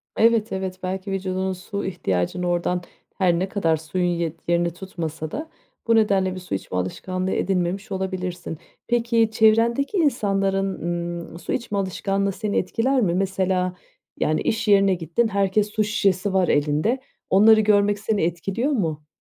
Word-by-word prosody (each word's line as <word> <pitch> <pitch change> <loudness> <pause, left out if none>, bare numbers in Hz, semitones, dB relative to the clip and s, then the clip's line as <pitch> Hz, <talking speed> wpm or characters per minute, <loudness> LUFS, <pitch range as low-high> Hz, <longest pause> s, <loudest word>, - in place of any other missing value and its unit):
Evet, 230 0 +3
evet. 190 -1 -4
Belki 190 +2 -3
vücudunun 190 0 -1
su 200 +2 -5
ihtiyacını 175 - -1
oradan 175 +1 0 0.4
-her 175 -3 +3
ne 190 +1 -1
kadar 165 -6 +1
suyun 180 +3 -2
ye 170 -2 -1
yerini 170 0 +1
tutmasa 165 -4 -5
da 315 +2 -5 0.4
bu 230 - +4
nedenle 195 -4 +2
bir 185 - -5
su 180 - -4
içme 95 -1 -4
alışkanlığı 185 - -2
edinmemiş 190 +1 -1
olabilirsin. 185 -3 -4 0.3
Peki, 230 -1 +2
çevrendeki 230 - +3
insanların, 195 - +1 0.5
ımm, 170 - -10
su - - -4
içme 230 -4 -2
alışkanlığı 195 +1 -1
seni 210 +1 -2
etkiler 255 +8 +1
mi? 180 -6 +2
Mesela, 185 -1 0 0.4
yani, 155 - +1
iş 225 0 -1
yerine 195 -1 +5
gittin, 170 +7 0
herkes 200 +1 +1
su 215 -1 +1
şişesi 200 -2 +1
var 185 -2 +3
elinde, 150 - +1 0.3
onları 215 +3 +6
görmek 205 -1 +3
seni 215 -1 0
etkiliyor 195 - -1
mu? 160 - -2
190 Hz, 150 wpm, -23 LUFS, 180-215 Hz, 0.5 s, onları